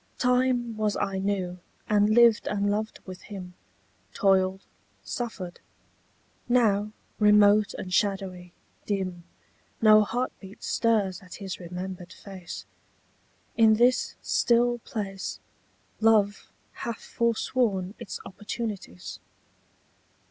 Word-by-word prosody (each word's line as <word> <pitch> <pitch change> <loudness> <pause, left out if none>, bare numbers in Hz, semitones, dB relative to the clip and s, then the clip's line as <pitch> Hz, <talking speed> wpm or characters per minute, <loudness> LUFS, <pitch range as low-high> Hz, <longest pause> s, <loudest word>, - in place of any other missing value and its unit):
Time 250 -2 +2
was 215 -1 0
I 195 -1 -1
knew, 190 -2 -2 0.3
and 210 0 +3
lived 230 0 +5
and 205 0 0
loved 215 +1 -2
with 185 -1 -9
him; 185 -4 -9 0.6
Toiled, 190 -1 +2 0.4
suffered. 200 -7 -5 0.9
Now, 215 -4 +3 0.3
remote 210 0 +5
and 185 - -6
shadowy, 190 -3 -1 0.4
dim, 185 -4 -2 0.5
No 215 -1 +7
heartbeat 215 -3 -5
stirs 210 -5 +1
at 185 -1 -11
his 195 -2 -6
remembered 180 0 -7
face. 190 -4 -9 0.9
In 220 -2 +6
this 245 +3 +3
still 240 0 +2
place 195 -4 -5 0.6
Love 215 -2 +3 0.3
hath 230 -1 -4
forsworn 225 -4 0
its 235 -6 -6
opportunities. 205 - -6
205 Hz, 95 wpm, -27 LUFS, 190-225 Hz, 0.9 s, No